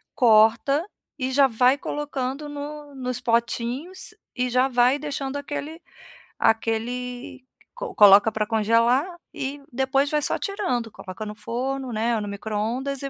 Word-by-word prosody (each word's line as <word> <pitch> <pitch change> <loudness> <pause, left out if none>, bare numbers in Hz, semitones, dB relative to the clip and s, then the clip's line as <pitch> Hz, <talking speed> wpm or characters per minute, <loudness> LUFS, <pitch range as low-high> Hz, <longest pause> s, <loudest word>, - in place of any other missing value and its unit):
corta 230 +5 +4 0.3
e 260 0 -1
já 275 +1 +5
vai 250 +3 +3
colocando 290 -1 -4
no 290 0 -7
nos 250 -2 -3
potinhos 245 - -2 0.2
e 250 -1 0
já 255 +2 +3
vai 250 +1 +3
deixando 285 -2 -4
aquele 290 +3 -6 0.6
aquele 245 +3 -1 0.3
co - - -7
coloca 205 +1 +7
para 215 0 -1
congelar. 230 +5 +3 0.3
E 285 -2 -5
depois 265 +2 +1
vai 300 -1 +1
só - - +2
tirando, 305 - -2
coloca 195 +3 -8
no 210 - -6
forno, 260 +3 -4
né, 230 +2 0
ou 220 - -1
no 205 - -5
micro-ondas 220 +7 -3
e 275 - -4
255 Hz, 140 wpm, -24 LUFS, 230-280 Hz, 0.6 s, coloca